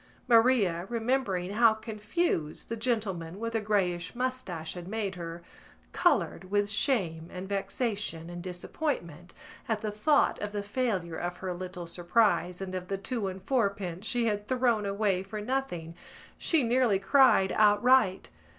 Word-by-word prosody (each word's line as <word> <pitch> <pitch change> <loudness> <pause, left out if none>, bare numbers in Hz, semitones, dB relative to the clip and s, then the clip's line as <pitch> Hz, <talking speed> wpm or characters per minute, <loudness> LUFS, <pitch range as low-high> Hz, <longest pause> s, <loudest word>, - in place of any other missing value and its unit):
Maria, 225 -8 +4
remembering 225 -6 -1
how 225 +1 +5
confused 215 - -2
the 230 - -2
gentleman 205 -7 -2
with 230 0 -3
the 225 - 0
greyish 190 -3 0
moustache 240 -11 -3
had 175 -1 -8
made 205 -1 -2
her, 170 -1 -7 0.5
coloured 195 - +1
with 205 0 +2
shame 190 - 0
and 185 +1 -6
vexation 195 -3 -2
and 175 0 -7
disappointment. 175 - -4 0.4
At 220 -2 0
the 215 -2 -2
thought 285 +8 +2
of 210 0 -4
the 205 -1 -2
failure 200 -7 -2
of 175 0 -4
her 185 -1 -4
little 180 0 -6
surprise 180 +1 +1
and 190 -1 -5
of 180 -1 -4
the 195 - -2
two 210 +1 -3
and 190 0 -6
fourpence 200 -6 -1
she 240 -1 +1
had 210 -2 -1
thrown 240 -5 +1
away 200 -2 +1
for 195 +3 -6
nothing 210 -9 -3 0.4
she 320 -5 +2
nearly 240 -3 +3
cried 200 -2 +4
outright. 210 -1 +4
205 Hz, 150 wpm, -29 LUFS, 180-230 Hz, 0.5 s, how